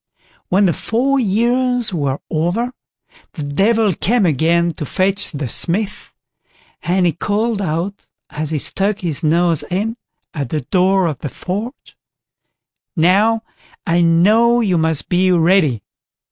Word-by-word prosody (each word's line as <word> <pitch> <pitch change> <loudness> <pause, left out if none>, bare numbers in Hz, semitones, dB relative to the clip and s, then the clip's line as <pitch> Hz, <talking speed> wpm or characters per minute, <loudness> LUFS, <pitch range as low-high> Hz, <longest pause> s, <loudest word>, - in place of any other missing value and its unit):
When 200 +2 +3
the 175 - +2
four 270 +4 0
years 240 +1 +1
were 140 -5 -1
over, 175 +10 -1 0.6
the 155 - -6
Devil 200 +8 +1
came 220 +5 +1
again 170 +2 +1
to - - -1
fetch 195 +5 0
the 145 -4 -5
Smith, 195 - -2 0.7
and 180 +1 +1
he 175 - +3
called 210 +5 -1
out, 185 +3 -3 0.2
as 155 0 -4
he 155 - -1
stuck 195 +7 -1
his 170 -4 -2
nose 165 0 +2
in 215 +6 -2 0.4
at 140 -6 -4
the 155 +1 -2
door 185 +6 +2
of 155 -6 -3
the 145 - -5
forge: 210 - -6 1.0
"Now, 200 +7 +3 0.4
I 170 +1 +2
know 210 +9 +4
you 190 -7 +1
must 160 -2 0
be 185 +1 +2
ready." 165 - +2
185 Hz, 135 wpm, -17 LUFS, 160-215 Hz, 1.0 s, know